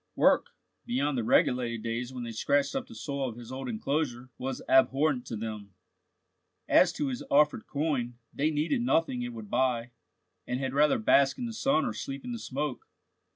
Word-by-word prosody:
Work, - - +4 0.4
beyond 140 +4 0
the 120 - 0
regulated 115 0 +2
days 115 +2 -3
when 125 -2 -6
they 115 - -5
scratched 140 +5 +1
up 265 -1 -2
the 240 - -12
soil 140 - -3
of 115 - -8
his 120 0 -10
old 130 0 -5
enclosure, 130 +1 -2
was 130 0 -4
abhorrent 135 0 +3
to 115 - -4
them. 105 -3 -6 0.9
As - - +5
to 145 - -1
his 125 - -4
offered 150 -5 +3
coin, 140 -5 -1 0.2
they 150 +3 +1
needed 160 - 0
nothing 165 - +1
it 120 0 -3
would 110 -3 -9
buy, 125 -2 +1 0.6
and 125 +1 -1
had 135 -1 -2
rather 150 +1 +4
bask 135 +5 +4
in 245 - -3
the 230 - -4
sun 275 +4 +2
or 245 - -2
sleep 275 -2 -6
in 250 - -4
the 235 - -4
smoke. 145 - -4
130 Hz, 190 wpm, -29 LUFS, 120-150 Hz, 0.9 s, As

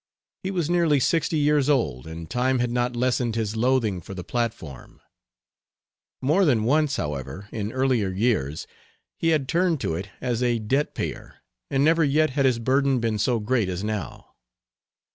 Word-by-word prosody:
He 190 - -3
was 175 -5 -1
nearly 170 -4 +3
sixty 160 +4 +1
years 150 -1 +2
old, 80 - 0
and 80 0 -7
time 130 +5 +1
had 120 -1 0
not 120 0 0
lessened 120 -1 0
his 110 -2 -2
loathing 115 -5 +1
for 95 - -9
the 90 - -6
platform. 110 - -4 1.2
More 155 +9 +3
than 125 -10 +3
once, 145 +4 +2
however, 75 +6 -5
in 105 -1 -3
earlier 130 -6 +1
years, 95 - -1 0.5
he 165 - 0
had 155 -5 +2
turned 170 -1 +1
to - - -1
it 95 +4 -5
as 125 -2 -2
a 120 -1 +2
debt 130 +7 -1
payer, - - -6 0.3
and 135 +1 +2
never 165 +1 +4
yet 155 +1 +2
had 135 0 +1
his 130 -3 +3
burden 135 +2 +2
been 115 -2 -1
so 115 +2 +1
great 110 -2 0
as 90 +1 -4
now. 105 -5 -5
125 Hz, 170 wpm, -24 LUFS, 105-145 Hz, 1.2 s, never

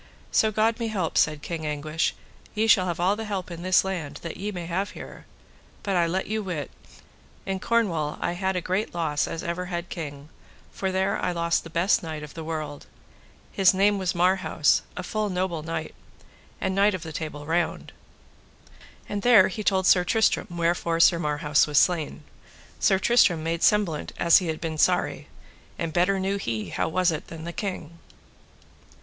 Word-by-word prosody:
So 220 - +3
God 220 +2 +1
me 230 - -1
help, 190 -7 -2
said 150 -1 +2
King 165 -2 -4
Anguish, 155 +1 -1 0.4
ye 215 +1 +2
shall 190 -4 +5
have 170 0 -3
all 185 +3 +2
the 220 - -5
help 195 -4 -4
in 170 0 -7
this 185 +1 +3
land 180 -7 -4
that 170 - -5
ye 205 +2 -4
may 175 -3 -6
have 185 +4 -2
here; - - -10 0.6
but 200 -2 -1
I 170 -1 +3
let 185 +3 -1
you 220 +1 -2
wit, 170 -8 -4 0.7
in 195 -1 -2
Cornwall 175 -10 0
I - - -1
had 190 +2 -1
a 180 - -1
great 185 +2 -2
loss 155 -4 0
as 165 - -5
ever 170 +2 -3
had 175 -1 -5
king, 145 -3 -7 0.4
for 190 -1 -2
there 190 +1 0
I - - +1
lost 170 -1 0
the 165 - -10
best 170 +4 +2
knight 155 -2 -6
of 150 - -9
the 165 - -7
world; 155 -2 -5 0.6
his 190 -1 +4
name 200 +1 +3
was 185 -2 -1
Marhaus, 180 -3 +2 0.2
a 180 - -4
full 215 +3 -2
noble 180 -3 -2
knight, 160 0 -5 0.7
and 190 - -1
Knight 200 +1 +3
of 185 - -6
the 160 - -7
Table 150 -2 -5
Round; 165 +1 -1 1.2
and 205 - -3
there 225 -6 +6
he 215 +3 -5
told 190 -2 +2
Sir 180 -1 +5
Tristram 220 +4 +2
wherefore 170 -1 0
Sir 170 0 +5
Marhaus 150 -1 +2
was 150 -1 -1
slain. 170 -2 +2 0.6
Sir 195 -3 +4
Tristram 190 -6 +3
made 165 +1 -2
semblant 200 -8 +1
as 170 -1 +6
he 180 - -4
had 160 -1 -3
been 160 -2 -4
sorry, - - +1 0.5
and 165 -2 -3
better 185 +3 +2
knew 195 +1 -1
he 115 - -3
how - - -1
it - - -5
was 185 +1 +2
than 160 0 -5
the 170 +1 -6
king. 175 -6 -5
175 Hz, 190 wpm, -25 LUFS, 160-190 Hz, 1.2 s, there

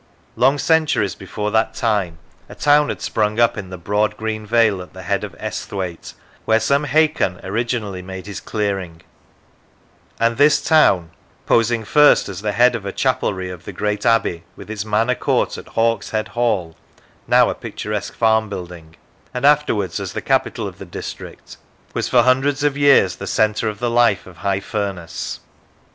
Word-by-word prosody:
Long 130 +5 +3
centuries 155 - +2
before 105 +2 -5
that 110 +1 +1
time 100 -8 0 0.3
a - - -10
town 145 0 +3
had - - -5
sprung 105 +1 0
up 120 -1 +4
in 100 -4 -7
the 95 - -7
broad 105 +4 0
green 110 -1 -4
vale 110 -4 +3
at 90 - -12
the 95 0 -10
head 100 +2 -1
of 100 -5 -7
Esthwaite, 95 -5 -5 0.3
where 110 0 +3
some 140 +6 +1
Hakon 150 - +1
originally 105 -1 -2
made 95 0 -8
his 100 -5 -6
clearing; 95 -6 -3 1.2
and 115 0 +1
this 150 +2 +5
town, 95 - +3 0.3
posing 115 -1 +2
first 150 +6 +5
as 95 -1 -6
the 105 -1 -2
head 120 +3 +4
of 115 -4 -4
a 100 - -4
chapelry 95 -1 -1
of 90 -2 -11
the - - -6
great 105 +2 -2
abbey, 110 -7 +1
with - - -10
its 105 -2 -3
manor 110 +3 +1
court - - 0
at - - -10
Hawkshead 115 -1 -1
Hall 105 -9 -1 0.5
(now - - +4
a - - -2
picturesque 105 -1 -5
farm 110 -1 +2
building), 90 -4 -8 0.4
and 125 +2 -1
afterwards 115 - +2
as 95 -4 -5
the - - -4
capital - - 0
of - - -10
the - - -7
district, - - -9 0.4
was - - -2
for 120 -2 +5
hundreds 135 +3 +2
of 145 -1 +2
years 140 -11 +4
the - - -7
centre 110 0 +1
of 105 - -6
the 120 +2 -1
life 120 -5 +3
of 90 -2 -14
High 100 0 -1
Furness. 100 -6 -4
105 Hz, 175 wpm, -20 LUFS, 95-120 Hz, 1.2 s, this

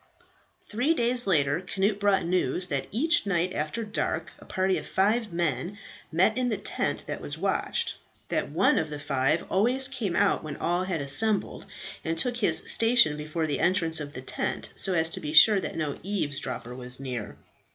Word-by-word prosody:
Three 250 +10 +1
days 245 -3 +1
later 150 -3 +2
Cnut 195 +2 -1
brought 200 -3 +2
news 180 0 0
that 140 -3 -2
each 315 - +2
night 180 -1 0
after 155 +10 -3
dark 210 0 -2
a - - -14
party 190 -1 0
of - - -10
five 210 +3 +1
men 170 +2 -2 0.3
met 185 +7 +3
in 250 -1 0
the 220 - -1
tent - - -2
that - - -5
was - - -4
watched; - - -1 0.3
that - - -1
one - - +3
of 160 - -2
the 150 - -5
five 145 +2 0
always 245 +7 +3
came 225 -10 -3
out - - +2
when 150 -2 -6
all 175 +2 0
had 180 -5 -2
assembled, 200 +10 0 0.4
and 165 +1 -2
took 245 +7 -1
his 225 - +1
station 230 -9 +4
before 155 +2 -3
the 145 -2 -2
entrance 165 -3 +2
of 145 -1 -6
the 130 - -8
tent, - - -3
so 190 - +1
as 160 -1 +3
to - - -5
be 150 - -5
sure 205 +6 +8
that - - -5
no 150 -3 -3
eavesdropper 145 - -4
was 125 0 -5
near. 125 -6 -5
180 Hz, 185 wpm, -27 LUFS, 150-210 Hz, 0.4 s, sure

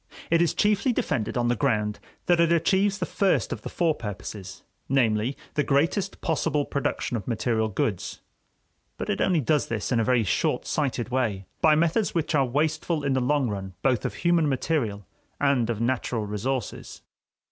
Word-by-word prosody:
It 165 0 +4
is 170 -3 +2
chiefly 210 +5 +2
defended 125 - -1
on 120 0 +1
the 120 - +2
ground 105 -5 0 0.3
that 175 -1 +3
it 170 0 +4
achieves 190 +4 +2
the - - -2
first 195 -2 +1
of - - -7
the - - -6
four 170 -3 +1
purposes, 105 -5 -7 0.3
namely, 120 -1 +1 0.2
the 150 - +1
greatest 170 +9 0
possible 155 -2 0
production 140 -3 -2
of 100 - -8
material 115 -1 0
goods, 100 -2 -2 0.8
but - - -2
it - - -1
only 175 -5 +2
does 145 +4 +1
this 115 +1 -3
in 120 - +3
a - - +2
very 125 0 +3
short 100 - 0
sighted 130 -5 -1
way, 110 -7 -1 0.2
by 155 -1 +6
methods 170 +6 +1
which 165 -1 0
are 140 -3 +3
wasteful 155 +3 0
in 140 -1 +1
the 130 - +1
long 140 +1 +1
run 95 -3 -5
both 130 -4 +2
of - - -3
human 170 -3 +2
material 120 - -1 0.3
and 135 -5 +2
of 115 -3 -1
natural 115 -2 -1
resources. 110 +3 -4
135 Hz, 180 wpm, -26 LUFS, 115-160 Hz, 0.8 s, by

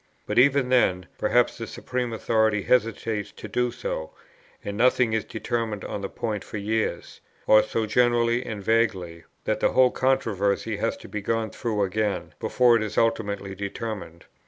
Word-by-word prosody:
But - - +1
even 135 0 +4
then, 95 -8 +3
perhaps - - +2
the - - -5
supreme 125 -2 -3
authority 110 -2 +1
hesitates 110 -4 0
to - - -9
do 125 +4 0
so, 80 -9 -4 0.6
and 100 - -4
nothing 125 0 +3
is 110 -2 +1
determined 110 -1 -3
on 100 - -4
the 100 - -4
point 105 -3 -3
for - - -7
years: 110 +2 -2 0.2
or 110 0 +7
so 110 +1 -2
generally 120 +1 +2
and 105 -5 -6
vaguely, 95 -7 0 0.2
that - - -1
the - - +2
whole 130 -1 +5
controversy 105 -4 0
has 115 +3 -1
to - - -12
be 105 - -5
gone 115 +1 -1
through 110 -4 -1
again, 100 0 -2
before 125 -2 +4
it - - -2
is 110 -1 -4
ultimately 100 -4 0
determined. 100 -3 -6
110 Hz, 165 wpm, -25 LUFS, 100-120 Hz, 0.6 s, or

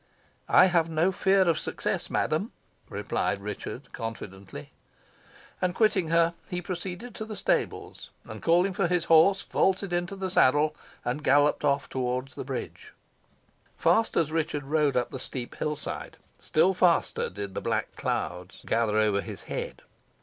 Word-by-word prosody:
"I - - +7
have 170 -3 +2
no 165 +4 +2
fear 190 0 +3
of 165 - +2
success, - - -3
madam," - - -1 0.4
replied - - -1
Richard, 105 +6 -7
confidently. 100 -4 -7 0.9
And 180 0 0
quitting 205 -6 +2
her, 170 +1 +3 0.2
he 180 - -2
proceeded 180 +6 -6
to 220 - -5
the 215 -1 -7
stables, - - -2 0.2
and - - -9
calling 175 +3 +3
for 185 -1 +1
his 175 -1 0
horse, 170 +5 +5
vaulted 190 -1 +1
into 175 +2 -1
the 190 -1 -4
saddle, 150 0 +4 0.3
and 130 +5 -2
galloped 145 +1 +3
off 140 -1 +1
towards 130 +1 -2
the - - -6
bridge. 130 -1 -6 0.8
Fast 225 0 +2
as 160 -2 +2
Richard 155 -2 -1
rode 145 -2 +1
up 125 - 0
the 130 - -5
steep 125 -1 -5
hill 150 0 -1
side, - - -6 0.2
still 185 +5 +2
faster 180 -2 +2
did 100 0 -6
the - - -4
black - - -2
clouds 90 +1 -4
gather 110 -2 +1
over 105 -2 +2
his - - -8
head. - - -5
155 Hz, 155 wpm, -27 LUFS, 125-180 Hz, 0.9 s, I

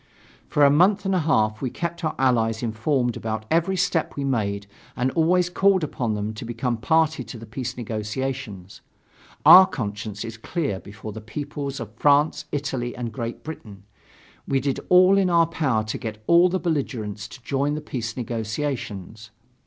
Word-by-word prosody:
For 145 - +4
a 140 - +6
month 190 +6 +4
and 195 - +1
a 185 - +3
half 110 -9 +1
we 130 - -1
kept 170 +5 -5
our 155 - -1
Allies 115 -3 +1
informed 120 +2 0
about 110 -1 -4
every 170 +4 +2
step 180 -2 0
we 140 - -3
made 100 -7 -1 0.3
and 130 +1 0
always 175 +3 +3
called 190 0 +3
upon 120 -7 -2
them 105 +1 -3
to 110 - -8
become 120 +1 -2
a - - -3
party 160 +5 +2
to 125 - -8
the 115 - -10
peace 125 +2 -5
negotiations. 110 -3 -5 0.6
Our 185 +1 +10
conscience 105 -4 -5
is 115 0 -7
clear 140 - -3
before 105 +2 -9
the 110 +1 -8
peoples 140 +4 -5
of 110 -3 -7
France, 150 +2 +3
Italy 135 -4 -3
and 120 -2 -5
Great 120 -2 -5
Britain.... 105 -11 -9 0.6
We 135 - +2
did 135 0 -1
all 185 +2 +6
in 190 -2 +2
our 170 -1 +5
power 140 -9 0
to 110 - -4
get 110 -1 -6
all 170 +5 +5
the 185 +1 -1
belligerents 120 - -3
to 115 +4 -13
join 140 +3 0
the - - -3
peace 120 -6 -5
negotiations. 110 -3 -4
130 Hz, 175 wpm, -24 LUFS, 110-155 Hz, 0.6 s, Our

